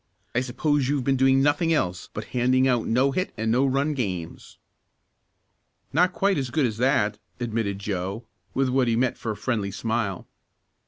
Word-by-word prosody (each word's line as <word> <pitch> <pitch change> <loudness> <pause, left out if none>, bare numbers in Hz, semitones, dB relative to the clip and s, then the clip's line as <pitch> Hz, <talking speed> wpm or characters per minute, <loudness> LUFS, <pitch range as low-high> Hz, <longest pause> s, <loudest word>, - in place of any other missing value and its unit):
I 125 - +2
suppose 135 +2 0
you've 140 -2 0
been 135 +1 +2
doing 135 +1 +4
nothing 145 +3 +2
else 90 - -1
but 105 - -5
handing 130 +1 +3
out 120 -3 +1
no 130 +4 +3
hit 185 +7 -1
and 110 0 0
no 130 +4 +3
run 140 +3 +1
games?" 95 - -5 1.4
"Not 180 +5 +4
quite 195 -2 +1
as 130 -2 -3
good 145 +2 +1
as 110 -3 -2
that," 110 -5 +1 0.2
admitted 115 -4 -2
Joe 100 +2 -4 0.3
with 135 -1 +2
what 130 -1 +2
he 115 - +2
meant 125 +1 +1
for 115 - -4
a 105 - -5
friendly 110 -6 -1
smile. 110 -2 -2
125 Hz, 175 wpm, -25 LUFS, 110-135 Hz, 1.4 s, doing